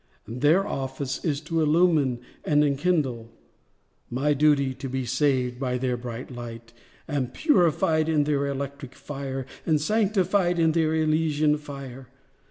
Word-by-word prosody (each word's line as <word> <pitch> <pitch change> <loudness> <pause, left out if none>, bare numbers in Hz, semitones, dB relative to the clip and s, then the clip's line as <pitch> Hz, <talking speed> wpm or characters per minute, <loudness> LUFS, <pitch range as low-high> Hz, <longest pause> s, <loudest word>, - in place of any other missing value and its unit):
Their 150 - +2
office 135 0 -4
is 145 -3 -1
to 160 +1 -1
illumine 155 -6 +3 0.2
and 150 0 +3
enkindle— 140 -6 0 0.8
My 140 +5 +1
duty, 140 -2 +3
to 135 +1 -7
be 130 0 -2
saved 125 -1 0
by 125 -2 -1
their 125 -1 -1
bright 120 +1 -7
light, 115 -1 -9 0.3
And 135 -4 -2
purified 165 - +2
in 155 -2 +3
their 145 -1 0
electric 140 -1 -5
fire, 135 -2 -5 0.2
And 155 -2 +2
sanctified 195 -1 +1
in 165 -1 +3
their 160 -1 +1
elysian 155 -1 +2
fire. 140 -3 -9
145 Hz, 135 wpm, -25 LUFS, 130-155 Hz, 0.8 s, illumine